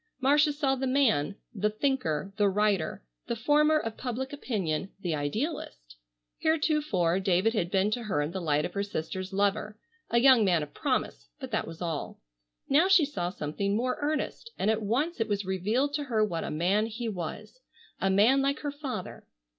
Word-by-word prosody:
Marcia 295 Hz, +3 st, +4 dB
saw 285 Hz, -2 st, 0 dB
the 265 Hz, 0 st, -1 dB
man, 225 Hz, -, +2 dB, 0.2 s
the 210 Hz, 0 st, 0 dB
thinker, 210 Hz, -, -1 dB
the 205 Hz, -2 st, +4 dB
writer, 195 Hz, -, 0 dB, 0.2 s
the 235 Hz, -, -1 dB
former 300 Hz, +6 st, +3 dB
of 225 Hz, -7 st, -4 dB
public 260 Hz, +2 st, -4 dB
opinion, 195 Hz, -, -2 dB
the 175 Hz, -4 st, -1 dB
idealist. 145 Hz, -, -4 dB, 0.5 s
Heretofore 295 Hz, -, +1 dB
David 190 Hz, +3 st, +2 dB
had 175 Hz, -7 st, 0 dB
been 195 Hz, +2 st, +2 dB
to 240 Hz, -, -1 dB
her 190 Hz, -8 st, 0 dB
in 150 Hz, -, -3 dB
the 190 Hz, +1 st, -4 dB
light 150 Hz, -2 st, +1 dB
of -, -, -5 dB
her 200 Hz, -, -1 dB
sister's 185 Hz, -1 st, -4 dB
lover, 205 Hz, +2 st, 0 dB, 0.3 s
a 235 Hz, -, +2 dB
young 250 Hz, -2 st, +6 dB
man 175 Hz, -5 st, +2 dB
of 145 Hz, -, -10 dB
promise, 270 Hz, -4 st, -2 dB
but 260 Hz, -2 st, -7 dB
that 220 Hz, -, -1 dB
was 165 Hz, +2 st, -7 dB
all. 165 Hz, -4 st, -4 dB, 0.5 s
Now 310 Hz, +7 st, +4 dB
she 380 Hz, -5 st, +6 dB
saw 180 Hz, -12 st, -3 dB
something 195 Hz, +4 st, -2 dB
more 250 Hz, +3 st, -1 dB
earnest, 305 Hz, +9 st, -2 dB
and 210 Hz, -, +2 dB
at 220 Hz, 0 st, -1 dB
once 260 Hz, +11 st, -1 dB
it 225 Hz, -, +1 dB
was 205 Hz, -2 st, -1 dB
revealed 215 Hz, +10 st, 0 dB
to 295 Hz, -1 st, -2 dB
her 220 Hz, -5 st, +2 dB
what 170 Hz, -5 st, -3 dB
a -, -, -4 dB
man 190 Hz, +8 st, +1 dB
he 230 Hz, +1 st, -5 dB
was, 185 Hz, -, -6 dB, 0.4 s
a 195 Hz, -, +1 dB
man 220 Hz, +8 st, +5 dB
like 275 Hz, +1 st, 0 dB
her 290 Hz, -, -2 dB
father. 285 Hz, -2 st, -6 dB
215 Hz, 185 wpm, -28 LUFS, 185-270 Hz, 0.5 s, young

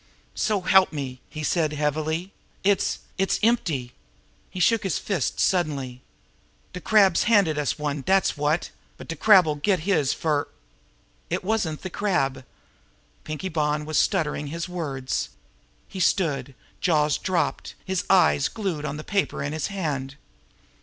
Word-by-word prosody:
"So 210 Hz, -3 st, 0 dB
help 190 Hz, +1 st, +5 dB
me!" 135 Hz, -4 st, -5 dB
he 155 Hz, -, -6 dB
said 155 Hz, -1 st, +1 dB
heavily. 155 Hz, +4 st, -1 dB, 0.3 s
"It's 200 Hz, 0 st, +1 dB, 0.2 s
it's 195 Hz, -, +1 dB
empty." 160 Hz, -, +1 dB, 0.6 s
He 185 Hz, -, -7 dB
shook 225 Hz, +5 st, +3 dB
his 190 Hz, -7 st, -1 dB
fist 185 Hz, -11 st, -2 dB
suddenly. 140 Hz, -9 st, 0 dB, 0.7 s
"De 180 Hz, -, -6 dB
Crab's 200 Hz, -4 st, +4 dB
handed 200 Hz, -9 st, +3 dB
us 145 Hz, -, -1 dB
one, 150 Hz, -1 st, -2 dB
dat's 190 Hz, +6 st, +2 dB
wot! 150 Hz, +3 st, 0 dB, 0.3 s
But -, -, -11 dB
de 165 Hz, -, -4 dB
Crab'll 175 Hz, -4 st, +5 dB
get 185 Hz, +2 st, +1 dB
his 155 Hz, -6 st, +1 dB
fer 150 Hz, -3 st, 0 dB, 0.4 s
" -, -, -37 dB
"It -, -, -2 dB
wasn't 185 Hz, -7 st, -1 dB
the 185 Hz, -, -5 dB
Crab!" 135 Hz, -11 st, 0 dB, 0.8 s
Pinkie 155 Hz, +4 st, -4 dB
Bonn 150 Hz, -1 st, 0 dB
was 155 Hz, 0 st, +1 dB
stuttering 150 Hz, -6 st, 0 dB
his 165 Hz, +4 st, -4 dB
words. 145 Hz, -7 st, -3 dB, 0.6 s
He 190 Hz, -, -8 dB
stood, 140 Hz, -8 st, 0 dB, 0.2 s
jaws 150 Hz, -4 st, +2 dB
dropped, 170 Hz, -6 st, -1 dB
his 190 Hz, -1 st, -1 dB
eyes 180 Hz, -7 st, +4 dB
glued 190 Hz, -9 st, -3 dB
now -, -, -1 dB
on 145 Hz, -, -5 dB
the 155 Hz, -, -7 dB
paper 200 Hz, -7 st, -1 dB
in 145 Hz, +1 st, -3 dB
his 155 Hz, -, -2 dB
hand. 145 Hz, -9 st, -3 dB
155 Hz, 150 wpm, -25 LUFS, 145-190 Hz, 0.8 s, help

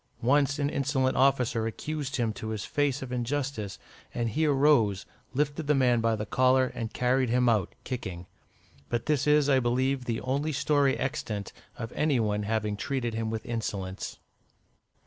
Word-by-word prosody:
Once 140 Hz, +3 st, +3 dB
an 140 Hz, -1 st, +1 dB
insolent 135 Hz, -2 st, 0 dB
officer 125 Hz, -4 st, +2 dB
accused 145 Hz, +4 st, -4 dB
him 115 Hz, -4 st, 0 dB
to 110 Hz, -, -7 dB
his 110 Hz, -1 st, -3 dB
face 140 Hz, -2 st, 0 dB
of 130 Hz, -, -7 dB
injustice, 125 Hz, -4 st, -2 dB, 0.4 s
and 120 Hz, -1 st, 0 dB
he 155 Hz, +7 st, +1 dB
arose, 135 Hz, -9 st, +3 dB, 0.3 s
lifted 145 Hz, +2 st, -1 dB
the 150 Hz, -, +4 dB
man 125 Hz, -3 st, +3 dB
by 115 Hz, 0 st, +2 dB
the 105 Hz, 0 st, -4 dB
collar, 130 Hz, +3 st, +3 dB
and 115 Hz, -2 st, -4 dB
carried 125 Hz, 0 st, +1 dB
him 125 Hz, +1 st, +3 dB
out, 110 Hz, -6 st, +1 dB
kicking. 95 Hz, -9 st, -5 dB, 0.6 s
But 120 Hz, -, -1 dB
this 150 Hz, -2 st, +1 dB
is, 150 Hz, -1 st, +4 dB
I 135 Hz, -2 st, +4 dB
believe, 130 Hz, +2 st, 0 dB
the 115 Hz, -2 st, -1 dB
only 140 Hz, +4 st, -1 dB
story 140 Hz, -1 st, +2 dB
extant 115 Hz, -8 st, -3 dB, 0.2 s
of 115 Hz, -, -5 dB
any 150 Hz, -4 st, +1 dB
one 105 Hz, -2 st, 0 dB
having 105 Hz, -1 st, -1 dB
treated 125 Hz, 0 st, -2 dB
him 110 Hz, 0 st, -2 dB
with 110 Hz, 0 st, -4 dB
insolence. 100 Hz, -5 st, -4 dB
125 Hz, 165 wpm, -28 LUFS, 115-140 Hz, 0.6 s, the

